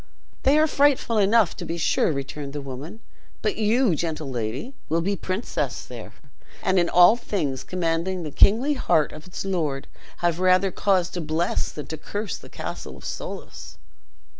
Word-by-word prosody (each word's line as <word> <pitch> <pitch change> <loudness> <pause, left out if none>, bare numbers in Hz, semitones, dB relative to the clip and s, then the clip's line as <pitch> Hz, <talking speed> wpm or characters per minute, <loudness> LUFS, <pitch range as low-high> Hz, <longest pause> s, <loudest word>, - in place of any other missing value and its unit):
"They 275 +3 +4
are 310 - +5
frightful 280 -6 +3
enough, 205 -2 +4
to - - -5
be 170 - -3
sure," 165 - +2
returned 140 0 -5
the 145 - -3
woman; 140 - -8 0.4
"but 215 - +1
you, 225 0 +3
gentle 155 -3 -3
lady, 120 - -3 0.2
will 165 +2 +2
be 200 +4 0
princess 175 - -3
there; 120 -3 -9 0.5
and 185 0 +3
in 175 - +2
all 180 +5 +7
things 150 - -2
commanding 175 +1 -1
the 155 - -5
kingly 235 - +4
heart 160 - +2
of 155 +3 -11
its 180 - -6
lord, 155 -8 -1 0.3
have 175 -1 0
rather 185 +1 +4
cause 185 -2 +1
to 175 - -4
bless 160 +2 -1
than 150 - -7
to 160 - -6
curse 205 +7 -4
the - - -13
castle - - -6
of - - -13
Soulis." - - -7
175 Hz, 170 wpm, -24 LUFS, 150-205 Hz, 0.5 s, all